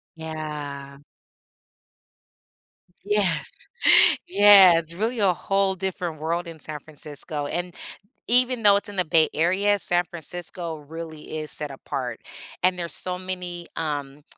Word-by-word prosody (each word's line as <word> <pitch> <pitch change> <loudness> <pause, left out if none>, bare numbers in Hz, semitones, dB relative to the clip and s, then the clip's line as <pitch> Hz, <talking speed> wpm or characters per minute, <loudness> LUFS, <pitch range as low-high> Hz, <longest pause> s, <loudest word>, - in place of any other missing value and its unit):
Yeah. 150 -3 -7 2.1
Yes! 205 -4 0 0.8
Yes, 190 - +7
really 225 +6 -2
a 195 -3 +3
whole 195 +1 0
different 180 -4 -4
world 170 +3 -2
in 165 -2 -9
San 150 0 -6
Francisco, 150 0 -6
and 175 +2 -4 0.5
even 250 0 +3
though 205 -1 +7
it's 205 +1 -1
in 200 - -7
the 180 - +2
Bay 160 -1 +3
Area, 195 +6 +2
San 175 -1 +1
Francisco 175 0 -5
really 155 +1 -8
is 155 - -6
set 150 -2 -1
apart. 130 -3 -5 0.4
And 180 0 +2
there's 170 -1 -3
so 180 0 -3
many, 180 -2 -6
um 145 -2 -4
170 Hz, 125 wpm, -24 LUFS, 155-190 Hz, 2.1 s, Yes